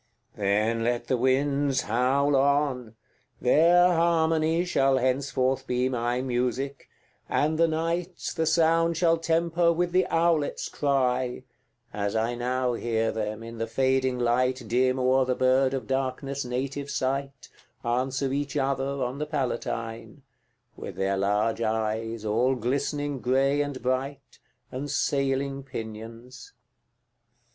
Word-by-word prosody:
CVI. -, -, -29 dB
Then 105 Hz, +3 st, +1 dB
let 120 Hz, 0 st, -1 dB
the 130 Hz, -, +1 dB
winds 135 Hz, +2 st, +1 dB
howl 130 Hz, +5 st, +1 dB
on! 135 Hz, -4 st, +1 dB, 0.4 s
their 170 Hz, +7 st, +5 dB
harmony 165 Hz, 0 st, +2 dB
Shall 135 Hz, -6 st, +2 dB
henceforth 130 Hz, 0 st, 0 dB
be 125 Hz, +1 st, 0 dB
my 120 Hz, 0 st, -1 dB
music, 130 Hz, +2 st, -2 dB, 0.4 s
and 155 Hz, +2 st, +1 dB
the 165 Hz, -, +5 dB
night 165 Hz, +2 st, -2 dB, 0.2 s
The 160 Hz, -1 st, 0 dB
sound 165 Hz, 0 st, +3 dB
shall 165 Hz, -1 st, +3 dB
temper 170 Hz, +1 st, +1 dB
with 175 Hz, +1 st, 0 dB
the 185 Hz, +1 st, +2 dB
owlet's 165 Hz, -3 st, +1 dB
cry, 130 Hz, -3 st, 0 dB, 0.5 s
As 100 Hz, 0 st, -2 dB
I 115 Hz, +2 st, 0 dB
now 125 Hz, +1 st, -1 dB
hear 115 Hz, -1 st, -1 dB
them, 110 Hz, 0 st, -4 dB
in 115 Hz, 0 st, -9 dB
the 115 Hz, -, -2 dB
fading 130 Hz, +1 st, +1 dB
light 125 Hz, +1 st, +1 dB
Dim 130 Hz, +3 st, +1 dB
o'er 130 Hz, +1 st, +3 dB
the 125 Hz, 0 st, 0 dB
bird 130 Hz, +1 st, +3 dB
of 130 Hz, -, -4 dB
darkness' 135 Hz, +1 st, -2 dB
native 135 Hz, +3 st, -4 dB
site, 135 Hz, 0 st, -3 dB, 0.4 s
Answer 130 Hz, +3 st, -1 dB
each 145 Hz, 0 st, -2 dB
other 135 Hz, 0 st, -1 dB
on 125 Hz, +3 st, -4 dB
the 150 Hz, -, -3 dB
Palatine, 120 Hz, -5 st, -4 dB, 0.5 s
With -, -, -8 dB
their 95 Hz, 0 st, 0 dB
large 105 Hz, +4 st, 0 dB
eyes, 110 Hz, 0 st, -2 dB
all 120 Hz, +5 st, +2 dB
glistening 140 Hz, +3 st, -2 dB
grey 135 Hz, +3 st, +2 dB
and 145 Hz, -2 st, -3 dB
bright, 135 Hz, +2 st, -3 dB, 0.3 s
And 140 Hz, +3 st, -5 dB
sailing 140 Hz, 0 st, 0 dB
pinions. 115 Hz, 0 st, -9 dB
130 Hz, 130 wpm, -26 LUFS, 120-145 Hz, 0.5 s, their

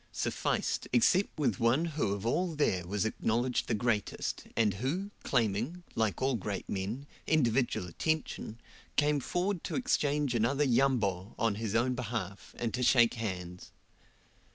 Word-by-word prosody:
sufficed, -, -, -1 dB
except 175 Hz, -, +3 dB
with 130 Hz, -10 st, +1 dB
one 120 Hz, +8 st, +3 dB
who 140 Hz, -9 st, 0 dB
of 100 Hz, +1 st, -5 dB
all 170 Hz, +7 st, 0 dB
there 95 Hz, -, +1 dB
was 105 Hz, +3 st, 0 dB
acknowledged 120 Hz, +3 st, 0 dB
the 115 Hz, -, +1 dB
greatest, 105 Hz, -1 st, -1 dB
and 110 Hz, -3 st, +3 dB
who, 180 Hz, +10 st, -2 dB
claiming, 120 Hz, -, 0 dB
like 110 Hz, -2 st, 0 dB
all 135 Hz, 0 st, +2 dB
great 100 Hz, -4 st, -3 dB
men, 105 Hz, +8 st, -3 dB, 0.2 s
individual 125 Hz, -, +2 dB
attention, 115 Hz, -, -2 dB, 0.4 s
came 150 Hz, 0 st, +3 dB
forward 180 Hz, +5 st, -1 dB
to -, -, -3 dB
exchange 150 Hz, -, +1 dB
another 120 Hz, +5 st, +2 dB
"Yambo!" 115 Hz, -8 st, +1 dB
on 115 Hz, -2 st, +2 dB
his 110 Hz, 0 st, -3 dB
own 125 Hz, +2 st, +2 dB
behalf, 110 Hz, -5 st, -5 dB
and 115 Hz, -2 st, -2 dB
to 125 Hz, -, -1 dB
shake 120 Hz, -2 st, +5 dB
hands. 90 Hz, -6 st, -5 dB
120 Hz, 145 wpm, -31 LUFS, 105-140 Hz, 0.4 s, shake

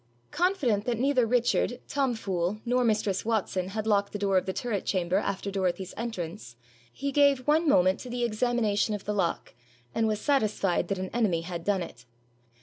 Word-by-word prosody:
Confident 290 Hz, -, +1 dB
that 240 Hz, -2 st, 0 dB
neither 255 Hz, -1 st, +2 dB
Richard, 245 Hz, +1 st, +1 dB
Tom 270 Hz, -4 st, 0 dB
Fool, 190 Hz, -1 st, -2 dB
nor 250 Hz, +1 st, +2 dB
mistress 210 Hz, -4 st, +1 dB
Watson 205 Hz, -5 st, -1 dB
had 215 Hz, +2 st, -4 dB
locked 200 Hz, -2 st, +1 dB
the -, -, -2 dB
door 200 Hz, -1 st, 0 dB
of 185 Hz, -, +2 dB
the -, -, 0 dB
turret 205 Hz, -1 st, -2 dB
chamber 185 Hz, -1 st, 0 dB
after 200 Hz, 0 st, -2 dB
Dorothy's 190 Hz, -1 st, -2 dB
entrance, 170 Hz, -, -5 dB, 0.4 s
he 280 Hz, -, -3 dB
gave 280 Hz, -3 st, +3 dB
one 310 Hz, +2 st, +3 dB
moment 185 Hz, -5 st, +4 dB
to 250 Hz, -, -8 dB
the 245 Hz, 0 st, -2 dB
examination 220 Hz, -2 st, +1 dB
of 205 Hz, -, -8 dB
the 210 Hz, -, -1 dB
lock, 190 Hz, -5 st, -1 dB, 0.4 s
and 225 Hz, -1 st, +1 dB
was 215 Hz, -1 st, 0 dB
satisfied 215 Hz, -, +1 dB
that 195 Hz, -, -1 dB
an 185 Hz, 0 st, -4 dB
enemy 210 Hz, -8 st, +1 dB
had 170 Hz, 0 st, -6 dB
done 195 Hz, -2 st, +1 dB
it. 125 Hz, -6 st, -12 dB
210 Hz, 185 wpm, -28 LUFS, 190-245 Hz, 0.4 s, moment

